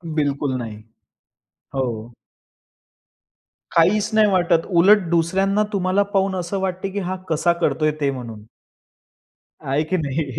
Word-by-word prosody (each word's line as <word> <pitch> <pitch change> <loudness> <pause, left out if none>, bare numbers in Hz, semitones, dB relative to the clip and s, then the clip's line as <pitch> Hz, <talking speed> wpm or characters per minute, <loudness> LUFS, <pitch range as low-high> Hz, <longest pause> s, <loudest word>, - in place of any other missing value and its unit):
बिलकुल 140 -2 0
नाही. 110 -3 -6 1.0
हो. 120 -3 -3 1.6
काहीच 190 +6 +3
नाही 215 -1 +5
वाटत. 175 -3 +2
उलट 195 +4 +6
दुसऱ्यांना 190 +5 +1
तुम्हाला 190 +1 +1
पाहून 195 -1 +1
असं 185 +2 -3
वाटते 190 +1 -2
की 200 +1 -4
हा 185 0 -3
कसा 165 +2 +2
करतोय, 155 0 +1
ते 140 - +2
म्हणून. 115 -5 -8 1.2
आहे 140 +3 0
की 185 - +2
नाही? 150 -1 -2
170 Hz, 120 wpm, -21 LUFS, 140-190 Hz, 1.6 s, उलट